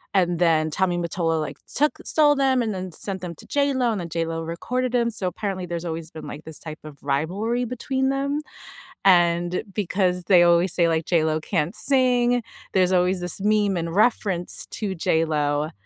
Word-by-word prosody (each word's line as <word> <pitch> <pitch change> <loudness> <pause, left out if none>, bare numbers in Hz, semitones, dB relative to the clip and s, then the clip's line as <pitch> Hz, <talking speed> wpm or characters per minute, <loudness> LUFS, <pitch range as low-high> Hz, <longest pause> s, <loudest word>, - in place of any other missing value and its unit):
and 175 -3 +2
then 160 -2 +2
Tommy 180 +1 0
Mottola, 170 -1 -1
like, 155 - -5 0.2
took 300 +1 +1
stole 300 -2 +5
them 265 -2 +2
and 215 -2 -2
then 185 -1 -5
sent 190 +2 -3
them 170 -2 -6
to - - -13
JLo, 270 -4 +1
and 205 - -3
then 170 - -6
JLo 165 0 -3
recorded 245 +10 -3
them. 235 -1 +2
So 195 -4 -1
apparently, 190 -1 -4
there's 170 0 -4
always 165 -1 -5
been, 160 - -9
like, 150 +2 -9
this 160 -1 -4
type 155 -1 -8
of 155 -2 -11
rivalry 190 - -1
between 265 +2 -2
them, 280 +2 -1 0.6
and 175 -1 +3
because 185 -3 0
they 180 -3 +6
always 170 +1 +4
say, 170 -2 +3
like, 160 0 0
"JLo 160 -2 +1
can't 155 +6 -1
sing." 245 -2 +3 0.3
There's 185 -1 +3
always 180 +1 +2
this 175 +2 0
meme 210 -1 +2
and 165 0 -3
reference 200 -5 +1
to 200 -3 -3
JLo, 155 -2 0
180 Hz, 180 wpm, -23 LUFS, 165-225 Hz, 0.6 s, they